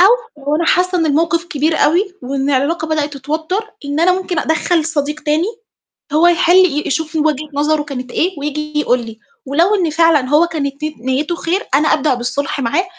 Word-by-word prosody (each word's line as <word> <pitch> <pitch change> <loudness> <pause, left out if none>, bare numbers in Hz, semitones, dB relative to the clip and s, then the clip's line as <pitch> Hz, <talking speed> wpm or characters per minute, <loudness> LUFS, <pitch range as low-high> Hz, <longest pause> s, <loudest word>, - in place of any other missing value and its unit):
أو 450 - +2
لو 295 +1 +2
أنا 335 - 0
حاسة 360 0 +2
إن 325 - +1
الموقِف 330 +3 +1
كبير 315 -1 -1
أوي 365 +4 +2
وإن 275 +2 -2
العلاقة 300 +4 0
بدأت 300 -2 -1
تتوتر 320 +10 -3
إن 285 +2 -2
أنا 360 +2 +4
ممكن 355 -3 -3
أدخّل 320 +1 +1
صديق 300 -1 -2
تاني 305 +4 0 0.7
هو 320 +3 +4
يحل 350 +1 +4
ي 315 -6 +4
يشوف 320 +2 -2
وجهة 305 -1 0
نظره 300 +1 +1
كانت 255 -4 -7
إيه 360 -1 -1
وييجي 300 +1 -3
يقُول 250 -4 +1
لي، 225 -1 -9 0.3
ولو 335 +9 +2
إن 355 -6 +1
فعلًا 315 -5 +3
هو 310 +4 +4
كانت 285 -3 -4
ني 310 -3 -4
نيته 275 +7 -1
خير، 360 +4 -2
أنا 300 +3 +3
أبدأ 295 -2 +1
بالصلح 275 +4 -3
معاه 285 +9 0
310 Hz, 190 wpm, -16 LUFS, 285-340 Hz, 0.7 s, أنا